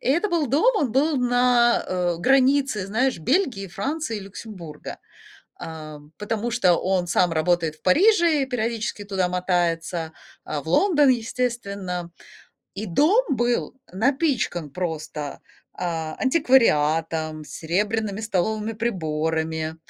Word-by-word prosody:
и - - -3
это 345 +10 +2
был 335 -5 +1
дом, 315 - +3
он 265 - 0
был 290 +3 +2
на, 245 -1 +3
э, 180 -2 -1
границе, 265 -2 +2
знаешь, 235 +1 0
Бельгии, 250 - 0
Франции 230 - -3
и - - -5
Люксембурга, 185 -6 -9 0.6
эм, 155 -1 -9
потому 220 +2 -2
что 195 -7 +3
он 185 -1 0
сам 175 0 +2
работает 160 -1 +1
в - - -33
Париже 340 - +4
и - - -1
периодически 225 -4 -3
туда 190 -3 -1
мотается, 175 -2 -1 0.3
э, 150 -2 -3
в 160 - -10
Лондон, 295 - +4
естественно. 200 -7 -2 0.6
И 210 +3 -5
дом 315 - +3
был 240 -2 0 0.2
напичкан 230 - 0
просто, 155 -3 -5 0.3
а, 165 -3 -3
антиквариатом, 160 - +2
серебряными 205 +6 -2
столовыми 215 +1 -1
приборами. 160 -6 -2
200 Hz, 120 wpm, -23 LUFS, 165-250 Hz, 0.6 s, Париже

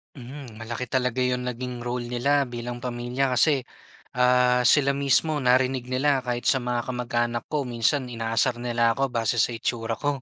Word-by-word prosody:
Mhm, 125 -4 -10
malaki 120 +2 -4
talaga 125 0 -1
'yong 125 0 0
naging 125 0 -5
role 120 0 -3
nila 140 +4 +1
bilang 120 0 -6
pamilya 125 +2 -2
kasi 135 +1 +3 0.5
ah 125 0 +3
sila 140 +3 +4
mismo 140 +2 +1
narinig 130 0 +2
nila 135 +1 +1
kahit 120 -1 -3
sa 135 - +3
mga 120 -1 -2
kamag-anak 120 -1 -2
ko 150 -3 -1
minsan 125 +3 0
inaasar 120 +1 -1
nila 120 -1 +1
ako 135 +2 -1
base 115 -1 +1
sa - - +2
itsura 115 -1 -2
ko. 145 -2 -2
125 Hz, 165 wpm, -25 LUFS, 120-130 Hz, 0.5 s, sila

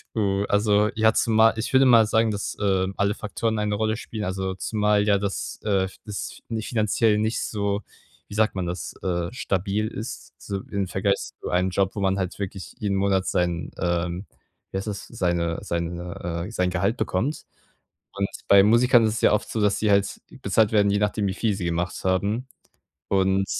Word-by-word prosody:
Oh, 100 -2 +1
also, 105 0 +3
ja, 110 0 +4
zumal 110 0 +4
ich 110 - -3
würde 130 +1 +6
mal 115 -3 +7
sagen, 110 0 +2
dass, 100 0 -4
ähm, 95 -1 +1
alle 100 0 +2
Faktoren 110 +1 -2
eine 105 0 0
Rolle 110 +1 0
spielen, 110 -2 -6
also, 95 0 -2
zumal 105 +1 +1
ja 100 -1 +4
das, 100 -1 -4
äh, 100 -3 +2
f 95 - -6
das 105 -2 -6
nicht 110 -2 -4
finanziell 110 -1 +2
nicht 110 +2 0
so, 100 -1 -1 0.5
wie - - -11
sagt 110 -1 +2
man 95 - -2
das, 85 0 -4
äh 85 -2 -1
stabil 100 -2 -1
ist, - - -7
so 100 -1 -4
im 100 -2 -1
Vergleich 100 +2 +1 0.2
zu - - -5
einem 90 +1 +1
Job, 95 +1 +1
wo 105 - -3
man 95 0 +1
halt 95 -1 -3
wirklich 95 -2 -6
jeden 100 -2 -1
Monat 95 -1 +1
sein, 90 -1 -1
ähm, 85 +1 -1 0.5
wie - - -3
heißt 95 +3 -4
das, 100 -1 -5
seine 85 -6 -1
seine, 85 0 -4
äh - - -9
sein 90 -5 0
Gehalt 95 +6 0
bekommt. 110 +7 -1 0.7
Und 100 0 -1 0.2
bei 100 -1 +7
Musikern 120 +3 +5
ist 110 - 0
es 115 - -3
ja - - +5
oft 105 - 0
so, 110 - -1
dass 105 -1 +2
sie 105 -1 +2
halt 100 0 +2 0.2
bezahlt 110 -2 +2
werden, 100 -1 +4
je 100 - +2
nachdem, 105 0 0
wie 95 - -1
viel 110 -3 0
sie 90 - -4
gemacht 85 +1 -2
haben. 100 +7 0 0.6
Und 95 0 +2
100 Hz, 195 wpm, -24 LUFS, 95-110 Hz, 0.7 s, mal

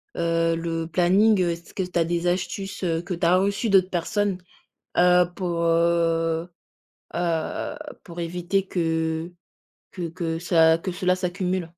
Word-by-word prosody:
heu 165 0 +1
le 165 0 -3
planning. 190 +5 +3
Est-ce 170 -1 -3
que 190 - -2
tu 180 -1 -2
as 165 - +3
des 170 +1 -1
astuces, 190 +2 -2
heu, 165 -1 0
que 180 +1 -5
tu 170 - -1
as 180 +2 +5
reçues 200 +4 0
d'autres 190 -2 +4
personnes, 195 +2 -1 0.6
heu, 180 0 +6
pour, 175 -3 -2
heu, 165 0 +1 0.7
heu 170 -2 -2 0.3
pour 170 0 -8
éviter 180 +3 -1
que 160 -1 -1 0.6
que 175 -3 -4
que 165 -1 -3
ça, 165 -2 +4
que 185 +3 -4
cela 180 0 +1
s'accumule? 180 0 -2
175 Hz, 150 wpm, -24 LUFS, 165-185 Hz, 0.7 s, heu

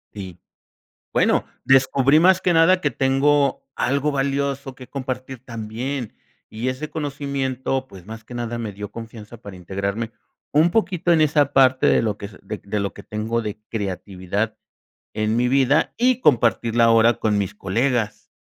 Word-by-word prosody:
Y 95 -4 -8 0.7
bueno, - - +2 0.2
descubrí 135 +2 +4
más 185 +2 +5
que 180 - +2
nada 170 +3 +5
que 145 - 0
tengo 140 +1 +2
algo 140 +3 0
valioso 140 -1 -1
que 130 -1 -12
compartir 130 -2 -5
también. 115 +2 -5 0.4
Y 115 +4 -3
ese 130 +4 -4
conocimiento, 135 -3 -3
pues 95 -5 -13
más 110 +1 -9
que 125 - -11
nada 120 -1 -3
me 110 -3 -4
dio 105 +1 -7
confianza 115 0 -10
para 100 -4 -10
integrarme 100 +5 -4 0.4
un 155 +4 +4
poquito 180 -5 +1
en 165 - +4
esa 145 -2 +3
parte 130 -1 +4
de - - +4
lo 105 -3 -1
que 100 - -7
s 100 -2 -14
de 105 +2 -6
de 100 +1 -3
lo 100 -1 -2
que 100 - -11
tengo 110 +3 -2
de 105 -2 -5
creatividad 100 0 -3 0.6
en 110 +1 0
mi 125 +1 +2
vida 135 +2 +2
y 250 +1 +2
compartirla 120 - +3
ahora 115 +1 +5
con 105 0 0
mis 100 -2 -2
colegas. 110 +2 -1
125 Hz, 165 wpm, -22 LUFS, 110-140 Hz, 0.7 s, más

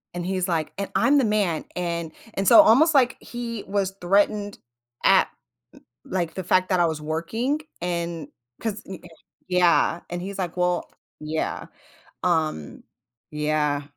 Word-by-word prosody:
And 175 0 -3
he's, 185 0 -1
like, 165 -3 -1
"And 200 - -3
I'm 285 +1 +4
the 265 - +2
man," 205 -7 0
and 170 -2 -3 0.2
and 195 0 -2
so 320 - +10
almost 310 +5 +5
like 255 -2 +4
he 235 -3 -6
was 195 -1 -1
threatened 205 +2 +1 0.5
at - - +6
n - - -36 0.6
like 175 -3 -1
the 190 - -4
fact 185 +1 +2
that 185 -2 +2
I 170 - +4
was 160 -2 -3
working 195 - -2 0.2
and 170 -3 -3 0.3
'cause 220 -2 -3
n 190 -2 -7
eh, - - -11 0.4
yeah, 175 -1 +3
and 175 0 -3
he's 195 +2 -6
like, 180 -3 -3
"Well," 180 -1 0 0.3
yeah, 155 +1 -3 0.6
um, 155 - -1 0.5
yeah. 150 -1 0
180 Hz, 155 wpm, -24 LUFS, 165-205 Hz, 0.6 s, so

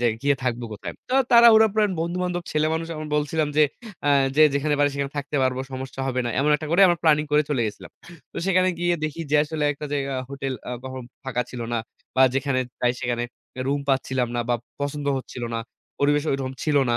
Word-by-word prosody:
যে - - -1 0.2
গিয়ে 140 0 +3
থাকবো 120 -1 -1
কোথায়? 105 - -6 0.2
তো 255 - -1 0.2
তাড়াহুড়া 230 -2 +8
প্লান, 215 -2 +3
বন্ধুবান্ধব 175 +1 -2
ছেলে 155 0 +2
মানুষ 165 0 -2
আমি 155 0 -5
বলছিলাম 150 +1 0
যে, 155 - +6 0.4
আ - - +4 0.3
যে 155 - +7
যেখানে 145 +1 +1
পাত্র 145 0 +3
সেখানে 140 0 -3
থাকতে 145 +1 -3
পারবো, 130 0 +1
সমস্যা 130 0 -6
হবে 130 -1 0
না। 120 - -1
এমন 150 +2 +2
একটা 155 - -7
করে 170 - +3
আমরা 175 -1 +2
প্ল্যানিং 150 -2 +4
করে 150 0 +5
চলে 130 -5 +1
গেছিলাম। 105 - -8 0.4
তো - - -12
সেখানে 185 -1 +3
গিয়ে 175 0 +2
দেখি 155 +2 -4
যে 150 - +4
আসলে 155 0 -3
একটা 150 +1 -7
জায়গায় 135 -2 -1
হোটেল 135 -1 -3 0.2
আ - - -4
কখনো 130 0 -6 0.2
ফাঁকা 125 -2 -1
ছিল 125 - -7
না। 120 - +1 0.4
বা 130 - +6
যেখানে 135 -1 +1 0.2
যাই, 125 0 +3
সেখানে 120 -1 -1 0.4
রুম 140 +1 0
পাচ্ছিলাম 130 -2 +1
না - - +1
বা 120 - +3 0.3
পছন্দ 145 0 -3
হচ্ছিল 125 -1 -8
না, - - 0 0.4
পরিবেশ 145 +1 +3
ওরকম 135 -1 -2
ছিল 150 -2 +1
না। 120 - +2
145 Hz, 210 wpm, -24 LUFS, 130-155 Hz, 0.4 s, তাড়াহুড়া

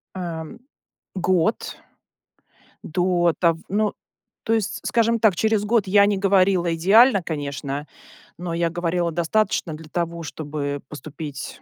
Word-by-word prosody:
Ам, 170 +2 -6 0.6
год 185 +2 0 1.1
до 175 0 +1
тав 165 -2 +2
ну 210 +2 0 0.5
то 225 - 0
есть 215 -2 -2
скажем 230 0 +2
так 210 -5 +4
через 220 +1 +1
год 220 -1 +2
я 200 +2 +5
не 205 -1 +1
говорила 190 -3 +3
идеально, 200 +6 +5
конечно, 145 -2 -4 0.5
но 175 -1 -4
я 170 0 0
говорила 175 0 -1
достаточно 175 +1 0
для 155 0 -10
того, 170 0 -3
чтобы 145 -2 -4
поступить, 150 -1 -8
175 Hz, 125 wpm, -23 LUFS, 160-200 Hz, 1.1 s, я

